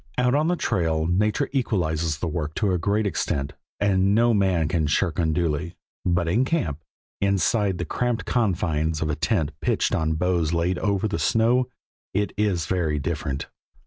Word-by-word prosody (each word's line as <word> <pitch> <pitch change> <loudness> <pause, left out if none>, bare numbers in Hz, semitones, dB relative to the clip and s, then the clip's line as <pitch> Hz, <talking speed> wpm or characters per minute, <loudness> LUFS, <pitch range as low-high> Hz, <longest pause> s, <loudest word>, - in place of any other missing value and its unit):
Out 125 0 +2
on 150 +3 +2
the 180 - +2
trail, 80 - 0
nature 105 +5 +1
equalizes 85 - 0
the 90 - -3
work 75 -1 -3
to 100 -4 +1
a 90 - +1
great 105 +5 +1
extent, 70 -7 -1 0.3
and 100 0 +3
no 120 +1 +4
man 95 -6 +2
can 80 -3 0
shirk 85 +3 0
unduly, 85 0 0 0.3
but 85 -1 +1
in 110 +10 +2
camp, 130 - -1 0.4
inside 100 0 +1
the 85 - -3
cramped 120 +7 -1
confines 80 -8 0
of 75 - -1
a - - -1
tent 80 -1 0
pitched - - +1
on 80 -1 +1
boughs 85 -1 0
laid 85 +2 0
over 100 0 0
the 105 - -2
snow, 120 +3 +2 0.5
it 105 +1 0
is 100 -6 0
very 80 -4 0
different. 70 -2 -3
90 Hz, 170 wpm, -24 LUFS, 80-105 Hz, 0.5 s, no